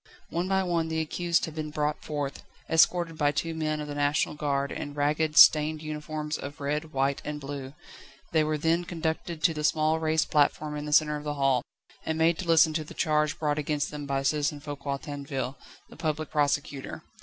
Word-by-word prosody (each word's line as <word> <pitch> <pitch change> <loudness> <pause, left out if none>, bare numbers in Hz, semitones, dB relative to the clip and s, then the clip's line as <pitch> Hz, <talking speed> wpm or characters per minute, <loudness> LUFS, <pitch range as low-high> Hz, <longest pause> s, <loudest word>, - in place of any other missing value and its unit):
One 175 +2 -1
by 190 0 +2
one 170 -3 0
the 160 0 -1
accused 170 +2 0
had 160 - -8
been 155 -1 -4
brought 150 0 -2
forth, 145 -2 -4 0.3
escorted 165 0 +3
by 145 -1 +3
two 165 +2 -2
men 155 -1 -1
of 150 - -5
the 145 - -5
National 145 +2 +1
Guard 140 -2 -1
in 145 0 -5
ragged, 150 +1 0
stained 155 +2 +7
uniforms 155 0 -4
of 145 +3 -7
red, 150 +2 -2
white, 135 0 0
and 150 0 -4
blue; 140 -1 -7 0.6
they 160 -1 +3
were 155 0 0
then 165 +3 +1
conducted 165 -2 -3
to 165 - +4
the 150 -1 -4
small 155 +1 +2
raised 160 0 +1
platform 150 0 +2
in 150 0 -4
the 150 - -5
centre 150 0 +4
of 150 - -8
the 150 -1 -3
hall, 135 -3 +2 0.4
and 160 - -2
made 160 0 +3
to 180 - -4
listen 165 -1 +5
to 155 0 -1
the 150 - -12
charge 150 -2 +1
brought 150 -1 0
against 150 0 -1
them 145 -1 -6
by 135 0 -1
Citizen 145 +1 0
Foucquier 145 -1 -4
Tinville, 140 -2 -5 0.3
the - - -14
Public 155 -1 -2
Presecutor. 145 -1 -1
150 Hz, 200 wpm, -28 LUFS, 145-160 Hz, 0.6 s, stained